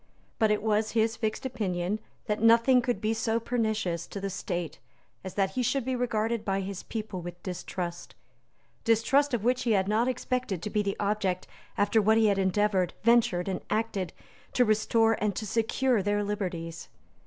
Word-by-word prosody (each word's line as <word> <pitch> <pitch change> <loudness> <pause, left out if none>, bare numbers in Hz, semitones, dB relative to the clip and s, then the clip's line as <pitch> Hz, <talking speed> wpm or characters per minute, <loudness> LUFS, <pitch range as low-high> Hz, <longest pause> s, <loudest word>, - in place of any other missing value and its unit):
But 220 - +4
it 210 0 +1
was 215 0 +1
his 225 0 +2
fixed 220 +2 -3
opinion 200 -5 -2 0.3
that 210 -2 -1
nothing 230 +3 +6
could 240 -4 -1
be 215 +1 +1
so 225 0 0
pernicious 220 -8 -1
to 200 - -6
the 195 0 -3
State 175 -3 -4 0.4
as 190 - -7
that 195 -2 +1
he 250 - -1
should 255 +1 0
be 260 0 -1
regarded 230 -2 -1
by 195 -1 0
his 195 0 -5
people 215 -5 -5
with 175 0 -9
distrust, 180 -1 -5 0.7
distrust 245 +5 +3
of 215 - -3
which 250 +2 +2
he 230 - +2
had 190 -2 +2
not 220 +4 +2
expected 250 -7 -2
to 210 - -4
be 210 - +1
the 200 -1 -2
object 200 -3 0 0.3
after 205 +2 +3
what 220 +2 +4
he 225 - +4
had 200 -2 +3
endeavoured, 190 -1 +1
ventured, 225 -6 +3
and 190 -1 -2
acted, 215 -4 -1 0.4
to 250 - +4
restore 225 +1 +2
and 205 -3 0
to 220 - -3
secure 230 +2 +1
their 205 +1 0
liberties. 180 -6 -4
215 Hz, 180 wpm, -28 LUFS, 195-230 Hz, 0.7 s, nothing